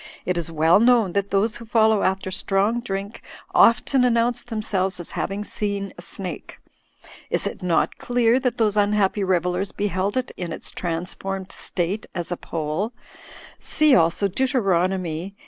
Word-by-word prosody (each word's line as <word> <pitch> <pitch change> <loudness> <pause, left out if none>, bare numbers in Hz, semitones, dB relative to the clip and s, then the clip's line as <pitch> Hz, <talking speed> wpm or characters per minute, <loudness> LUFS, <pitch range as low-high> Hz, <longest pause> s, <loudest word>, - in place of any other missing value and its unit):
It 180 - 0
is 170 -1 0
well 160 +4 +4
known 230 -5 +4
that 200 0 0
those 205 +3 +1
who 235 - -10
follow 220 -2 +3
after 190 0 -1
strong 200 +4 +1
drink 200 -2 -5 0.3
often 250 +3 +4
announce 240 0 +2
themselves 200 -5 -2
as 175 - 0
having 200 +1 -3
seen 200 -2 -3
a - - -11
snake. 175 -1 -7 0.7
Is - - 0
it - - -4
not 180 -2 0
clear 245 0 +2
that 255 -2 -1
those 215 -3 +2
imhappy 205 -1 +2
revellers 180 +1 0
beheld 200 +1 -1
it 255 0 -2
in 175 -2 -5
its - - -3
transformed 185 +3 -4
state 185 +4 -3
as 175 -1 -4
a 175 - -2
pole; 165 +8 -3 0.7
see 305 -2 +3
also 170 +2 +3
Deut. 260 +8 0
xviii. 185 - 0
195 Hz, 155 wpm, -23 LUFS, 180-220 Hz, 0.7 s, well